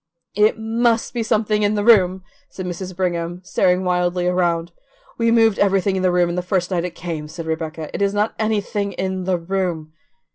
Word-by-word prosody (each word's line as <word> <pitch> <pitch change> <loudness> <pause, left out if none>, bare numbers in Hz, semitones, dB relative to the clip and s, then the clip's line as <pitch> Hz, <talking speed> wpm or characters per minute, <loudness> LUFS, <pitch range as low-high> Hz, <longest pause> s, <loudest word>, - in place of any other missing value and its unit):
"It 210 +2 +3
MUST 225 +1 0
be 240 - -1
something 215 -1 +1
in 205 +1 +2
the 205 - 0
room," 190 -5 +4 0.3
said 185 - -7
Mrs. 180 +1 -5
Brigham, 175 -1 -2
staring 180 0 +1
wildly 180 0 0
around. 175 -2 0 0.5
"We 230 0 +3
moved 225 -3 +4
everything 195 -1 +2
in 190 - -1
the 185 -1 +2
room 175 -1 +2
the 180 - -1
first 180 0 -1
night 175 -1 0
it 175 -1 -6
came," 160 -3 -5
said 165 +2 -7
Rebecca; 160 -1 -4
"it - - -4
is 200 0 +2
not 205 +2 0
anything 205 -2 -1
in 190 -1 -3
the 185 -1 +1
room." 170 -3 -3
185 Hz, 190 wpm, -20 LUFS, 175-205 Hz, 0.5 s, room